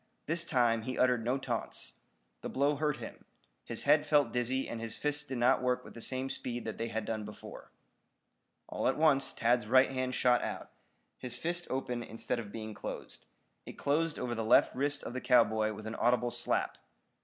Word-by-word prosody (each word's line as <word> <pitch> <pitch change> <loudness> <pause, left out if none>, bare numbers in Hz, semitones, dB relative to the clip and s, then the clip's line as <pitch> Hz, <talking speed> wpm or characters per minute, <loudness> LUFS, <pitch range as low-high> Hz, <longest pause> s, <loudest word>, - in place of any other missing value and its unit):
This 170 +2 +1
time 120 -6 +2
he 130 +3 -4
uttered 125 -2 +3
no 125 +4 +1
taunts. 135 - -3 0.4
The - - -5
blow 140 +2 +1
hurt 150 -1 0
him. - - -9 0.4
His - - -2
head - - +5
felt 145 -5 +3
dizzy 125 +2 0
and 115 - -5
his 115 -1 -5
fists 150 0 0
did 135 -3 -5
not 120 +1 +3
work 125 0 0
with - - -11
the 115 - -9
same 130 +3 -1
speed 120 -2 -5
that 110 - -5
they 115 - -1
had 110 -1 -3
done 110 -1 -3
before. 105 0 -10 1.0
All - - -2
at - - +1
once 145 -3 +3
Tad's 120 -1 +1
right 130 +3 +5
hand 130 -1 -2
shot 125 -1 +3
out, - - -5 0.5
his 125 -1 -3
fist 175 +1 -2
open 125 -2 -2
instead 115 +1 -3
of 105 -3 -7
being 110 -1 -6
closed. 100 - -8 0.4
It - - -7
closed 155 +2 0
over 125 -1 -2
the 115 -1 -2
left 110 - +4
wrist 145 +2 0
of - - -6
the 130 - -4
cowboy 110 -3 +3
with 110 +1 -9
an 110 - -4
audible 120 0 +2
slap. - - 0
125 Hz, 200 wpm, -32 LUFS, 115-135 Hz, 1.0 s, head